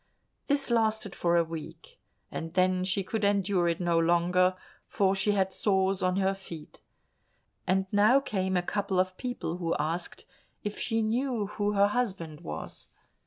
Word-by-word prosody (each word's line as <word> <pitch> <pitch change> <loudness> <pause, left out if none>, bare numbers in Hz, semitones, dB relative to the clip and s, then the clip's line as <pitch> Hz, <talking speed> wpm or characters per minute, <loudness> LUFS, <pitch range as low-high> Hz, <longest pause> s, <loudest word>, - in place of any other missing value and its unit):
This 280 -3 0
lasted 220 -3 +1
for 170 0 +1
a 170 - +4
week, 165 - -9 0.3
and 165 +1 -6
then 185 0 +3
she 190 +1 0
could 215 +3 -3
endure 200 -3 +2
it 170 -1 0
no 170 -2 +2
longer, 175 +2 +3 0.3
for 195 -1 +2
she 195 +2 +1
had 190 -1 +1
sores 190 -1 +1
on 185 0 +1
her 195 0 +2
feet. 170 -5 -11 0.9
And 190 +1 +2
now 215 +6 +5
came 190 -7 -1
a 175 - 0
couple 195 0 -1
of 185 0 +1
people 245 -9 -4
who 170 -2 -1
asked 165 +3 -3 0.4
if 210 0 -4
she 225 -1 0
knew 235 0 0
who 205 0 -2
her 200 0 +4
husband 190 -10 -2
was. 80 +1 -7
190 Hz, 165 wpm, -29 LUFS, 175-210 Hz, 0.9 s, now